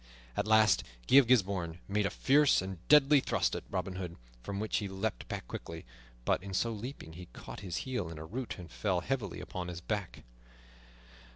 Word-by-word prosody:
At - - -1
last 110 -2 +5 0.2
Guy - - +7
of 135 -4 +8
Gisbourne 95 -8 +2
made 100 0 +1
a - - -2
fierce 145 +1 +4
and 95 -1 -5
deadly 150 -1 +7
thrust - - 0
at - - -5
Robin 90 -1 -3
Hood, 90 -2 -5 0.3
from 100 +11 -4
which 110 +1 0
he 100 - -2
leaped 95 -10 -3
back - - -6
lightly, 80 0 -6 0.4
but - - +2
in 95 0 -6
so 115 +5 +1
leaping 110 - -7
he 90 +2 -9
caught - - -9
his 95 -4 -4
heel 125 -10 -2
in 85 - -8
a 80 - -7
root 120 +8 -5
and 90 -3 -10
fell 95 -4 0
heavily 110 -6 -2
upon 90 -1 -5
his 90 -1 -5
back. 100 +1 -4
100 Hz, 195 wpm, -32 LUFS, 90-115 Hz, 0.4 s, of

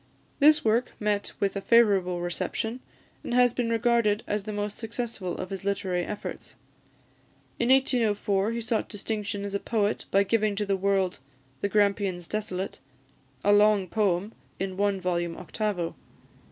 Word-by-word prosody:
This 300 -1 +6
work 225 +3 +2
met 210 -1 0
with 200 0 0
a 200 - -2
favourable 195 -6 +3
reception, 220 +7 -3 0.4
and 240 - -2
has 245 -1 +5
been 245 -2 -1
regarded 230 -2 +2
as 205 -1 -2
the 215 - -4
most 205 0 -3
successful 225 -5 -4
of 185 - -6
his 195 -1 -5
literary 190 -3 -1
efforts. 205 - -6 1.0
In 235 - +1
1804 220 -6 +2
he 235 0 -3
sought 225 0 -1
distinction 210 -1 -3
as 200 - -5
a 200 - 0
poet 210 -1 -1
by 195 +1 +4
giving 215 0 +1
to 210 +1 -1
the 200 -1 +1
world 190 -1 0 0.4
"The 200 - 0
Grampians 200 -4 +1
Desolate," 195 -5 -4 0.6
a 205 - +5
long 205 -2 +4
poem, 200 0 0 0.3
in 190 0 -3
one 200 0 +1
volume 175 -2 -1
octavo. 180 -1 -2
205 Hz, 155 wpm, -27 LUFS, 195-220 Hz, 1.0 s, This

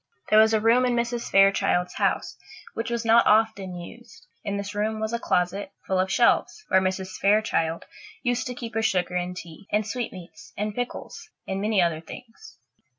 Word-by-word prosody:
There 215 - +7
was 220 0 +6
a - - +3
room 230 +3 +4
in 250 -1 +1
Mrs. 235 0 -2
Fairchild's 195 -2 +3
house - - -1 0.4
which 225 - -3
was 235 -1 -2
not 230 +1 +5
often 210 -4 +2
used. 175 - -12 0.2
In 200 -2 -2
this 200 0 -5
room 215 +1 -1
was 220 +1 -3
a 235 - 0
closet, 190 0 -1
full 190 -1 0
of 190 +1 0
shelves, 245 - +2
where 190 - +4
Mrs. 190 0 -3
Fairchild 195 -6 +1 0.4
used 245 +1 0
to 250 - -5
keep 235 -2 -7
her 225 - 0
sugar 185 -4 0
and 180 0 -2
tea, 170 +1 -11
and 210 +1 +1
sweetmeats 215 -6 -7
and 210 +1 -2
pickles, 250 +8 -6 0.2
and 190 0 -2
many 210 -3 +2
other 165 -2 -1
things. 250 - -12
210 Hz, 185 wpm, -25 LUFS, 185-235 Hz, 0.4 s, There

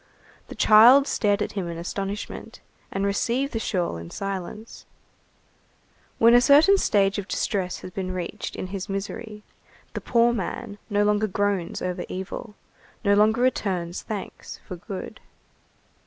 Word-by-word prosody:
The - - -9
child 240 +6 +7
stared 205 -6 +1
at - - -5
him 195 -4 -3
in 170 -1 -5
astonishment, 195 +4 -5 0.3
and 195 +1 -1
received 240 +7 0
the 225 - -1
shawl 180 - -1
in 85 0 -8
silence. 195 - -6 1.3
When 230 +1 +6
a 245 - +7
certain 305 +10 +6
stage 200 - +2
of 195 - -6
distress 185 -4 -2
has 185 - -8
been 185 0 -4
reached 180 -2 -5
in - - -4
his 195 +1 -5
misery, 210 +2 -5 0.5
the - - -4
poor 235 0 +3
man 205 0 -5
no 205 -1 +2
longer 210 +1 +2
groans 200 -3 -1
over 180 0 -2
evil, 190 +3 -6 0.5
no 200 - +5
longer 215 +3 +4
returns 185 -9 -1
thanks 210 -4 -7
for 180 - -5
good. 185 +2 -8
205 Hz, 145 wpm, -25 LUFS, 185-225 Hz, 1.3 s, child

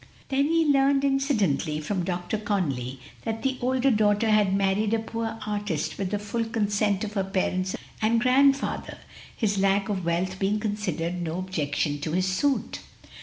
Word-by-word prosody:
Then 275 +1 +2
he 330 +1 +3
had 300 - +3
learned 275 0 +3
incidentally 210 - +1
from 180 +4 -2
Dr. 180 +3 -2
Conly, 140 - -2 0.2
that 225 -1 -3
the 265 -1 -1
older 260 +2 +2
daughter 210 0 +3
had 210 -2 +4
married 200 +3 +2
a - - +2
poor 225 0 -4
artist 205 -6 -2
with 195 -2 -1
the 205 - -1
full 210 +3 -2
consent 205 -2 0
of 210 -1 -4
her 195 -2 0
parents 185 -1 -1 0.3
and 225 +2 +3
grandfather, 270 +3 +2 0.4
his 205 -3 0
lack 195 +1 +2
of 190 -3 -2
wealth 180 +3 -1
being 205 +2 +1
considered 185 -5 -2
no 165 0 -3
objection 150 -5 -1
to 155 +2 -3
his 185 +1 +2
suit. 260 +9 0
205 Hz, 170 wpm, -26 LUFS, 185-225 Hz, 0.4 s, had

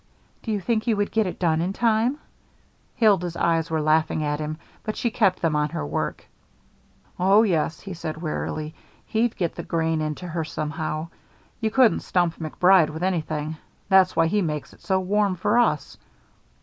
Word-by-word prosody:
"Do 225 - -4
you 210 - 0
think 215 +4 0
he 225 -1 0
would 205 0 -1
get 220 -3 +1
it 180 - -5
done 165 -3 +1
in 180 +3 -1
time?" 230 +4 +1 0.8
Hilda's 195 -8 +2
eyes 165 -1 +1
were 160 -1 0
laughing 155 0 +2
at 150 0 -1
him, 155 0 -4 0.2
but 215 - -4
she 235 - -1
kept 195 -6 +1
them 160 -2 +2
on 150 0 +1
her 75 - -4
work. 75 - -3 0.9
"Oh, 195 +4 +5
yes," 165 -6 0
he 195 - -7
said 160 -2 -5
wearily. 155 -1 -4 0.3
"He'd 225 +1 0
get 170 -3 -1
the - - -6
grain 160 -1 -1
into 155 +3 -4
her 165 0 -2
somehow. 155 +1 -4 0.5
You 220 -2 0
couldn't 250 0 +4
stump 175 -2 0
MacBride 170 +1 +4
with 160 +3 -6
anything. 155 -4 -2 0.3
That's 190 -1 +5
why 165 0 +4
he 205 +5 +1
makes 150 -4 -3
it - - -20
so 190 -2 +1
warm 200 +1 +1
for 185 +7 +2
us." 240 - 0
170 Hz, 180 wpm, -24 LUFS, 155-205 Hz, 0.9 s, Oh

